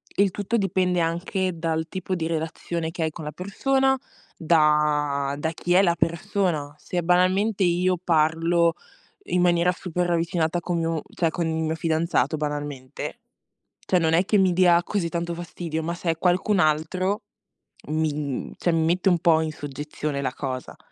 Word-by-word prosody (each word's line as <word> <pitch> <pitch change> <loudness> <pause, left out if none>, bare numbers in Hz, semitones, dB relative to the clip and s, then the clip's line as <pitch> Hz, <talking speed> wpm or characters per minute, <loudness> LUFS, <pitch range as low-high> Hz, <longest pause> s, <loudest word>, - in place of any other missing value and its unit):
il 200 -1 +3
tutto 205 +4 -2
dipende 185 -3 +1
anche 175 +2 -1
dal 160 0 -1
tipo 185 0 -3
di 165 - -2
relazione 165 0 -3
che 165 -1 -3
hai 160 - +1
con 155 0 -8
la 150 - -4
persona, 265 +8 +1 0.4
da 150 -3 +2
da 160 +2 -2
chi 175 +2 -1
è 190 - +6
la 170 -3 +3
persona. 165 -3 -1
Se, 175 +3 -3
banalmente, 185 +4 +2
io 180 +1 +2
parlo 165 +1 +2 0.5
in 180 0 +1
maniera 175 0 +3
super 180 0 -2
ravvicinata 170 0 0
con 175 0 -2
mio 165 -1 -1
cioè 165 -2 +1
con 170 -1 -2
il 160 - -1
mio 160 0 -1
fidanzato, 160 -3 0
banalmente, 145 -3 -5 0.7
cioè 180 - +2
non 160 -1 +2
è 175 +3 +4
che 210 +1 +2
mi 190 -1 +4
dia 175 -1 +5
così 175 -5 -2
tanto 170 0 -2
fastidio, 165 -1 -5
ma 170 +2 -2
se 170 -1 -2
è 165 - -7
qualcun 185 +3 +2
altro, 180 +6 +1 0.7
mi, 155 0 0
mhmm 145 -3 -4
cioè, 175 - +1
mi 160 -1 +2
mette 175 +3 +2
un 175 -2 +4
po' 160 -1 +4
in 160 - -1
soggezione 145 0 -5
la 130 -2 -2
cosa. 130 -2 -5
170 Hz, 170 wpm, -24 LUFS, 155-180 Hz, 0.7 s, è